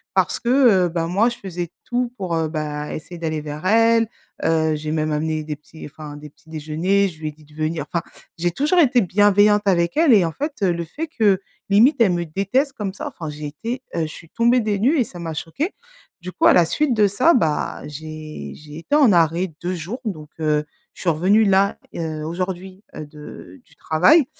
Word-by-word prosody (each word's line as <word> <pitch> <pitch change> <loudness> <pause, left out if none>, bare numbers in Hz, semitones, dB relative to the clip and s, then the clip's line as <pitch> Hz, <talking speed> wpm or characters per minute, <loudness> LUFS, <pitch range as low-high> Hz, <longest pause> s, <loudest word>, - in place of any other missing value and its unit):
parce 185 -1 +1
que, 235 - -2
heu, 235 -9 +5
ben, 165 -1 -2
moi 200 +7 +2
je 235 - -7
faisais 175 -3 -5
tout 245 0 -1
pour, 185 -5 -2
heu, 160 -1 0
bah, 150 -1 -4
essayer 170 +3 -8
d'aller 160 -2 -2
vers 150 +2 -7
elle, 230 +1 +4 0.3
heu, 160 -1 +2
j'ai 150 0 -4
même 155 0 0
amené 155 +1 -1
des 150 0 -4
petits 150 +2 -13
enfin 150 0 -9
des 150 0 -10
petits 150 - -25
déjeuners, 160 +6 0
je 165 -4 -10
lui 155 -1 -3
ai - - -7
dit 155 +1 -20
de 150 - -21
venir 155 +1 -2
enfin, 170 - -1 0.3
j'ai 175 +1 0
toujours 295 - +1
été 255 -6 +5
bienveillante 205 +2 +4
avec 170 +2 +2
elle 315 -5 +5
et 195 -5 +5
en 165 - -2
fait, 290 - -4
heu, 185 - +3
le 170 0 -3
fait 305 - -5
que, 210 - +2 0.3
limite, 225 +9 +5
elle 195 -6 +5
me 175 0 -1
déteste 200 - 0
comme 205 -7 -4
ça, - - -6
enfin 160 -2 -7
j'ai 150 0 -7
été, 230 - -5
heu, 170 - 0
je 160 - -1
suis 160 +1 -12
tombée 235 +5 +3
des 215 -3 -1
nues 270 +10 +3
et - - +4
ça 180 -5 -11
m'a 165 -2 -4
choquée. 225 - -3 0.5
Du 180 +1 -6
coup, - - 0
à - - +7
la 175 - +5
suite 275 - 0
de 210 -2 +4
ça, 255 - +3
bah, 160 -11 0
j'ai 155 +1 -8
j'ai 150 0 -11
été 285 - -1
en 280 -7 +6
arrêt 170 0 +2
2 180 +1 -2
jours 185 +10 -6
donc 155 -8 -5
heu, 150 -1 +1 0.3
je - - -12
suis 180 - +1
revenue 190 +8 +3
là, 195 0 +3 0.2
heu, 155 -2 -4
aujourd'hui, 185 +3 -5
heu, 155 - -6
de 150 - -12
du - - -25
travail 260 - +4
175 Hz, 225 wpm, -21 LUFS, 155-215 Hz, 0.5 s, à